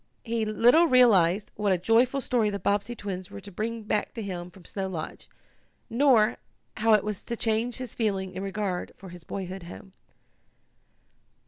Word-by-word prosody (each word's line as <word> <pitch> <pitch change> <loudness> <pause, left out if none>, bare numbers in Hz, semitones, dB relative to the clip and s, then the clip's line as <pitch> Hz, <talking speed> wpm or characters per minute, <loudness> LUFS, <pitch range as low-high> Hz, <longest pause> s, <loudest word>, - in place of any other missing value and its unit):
He 230 -1 -1
little 240 +10 +5
realized 210 - +4
what 205 -1 0
a 185 - +3
joyful 235 +8 +2
story 235 -4 +1
the 200 - -3
Bobbsey 205 +4 -1
twins 190 -4 -6
were - - -8
to 200 +1 -11
bring 225 +4 -4
back 210 +2 -2
to 225 - -4
him 180 -3 -5
from 180 -1 -17
Snow 195 -1 -4
Lodge, 165 -4 -6 0.6
nor 235 -3 +4 0.4
how 225 0 +3
it 210 - +4
was 210 -2 -4
to 235 - -5
change 225 +2 0
his 255 -3 -6
feeling 195 -4 -1
in 185 - -5
regard 195 -2 -3
for 190 - -11
his 175 -1 -11
boyhood 190 +1 -6
home. 180 +2 -11
210 Hz, 175 wpm, -27 LUFS, 190-230 Hz, 0.6 s, little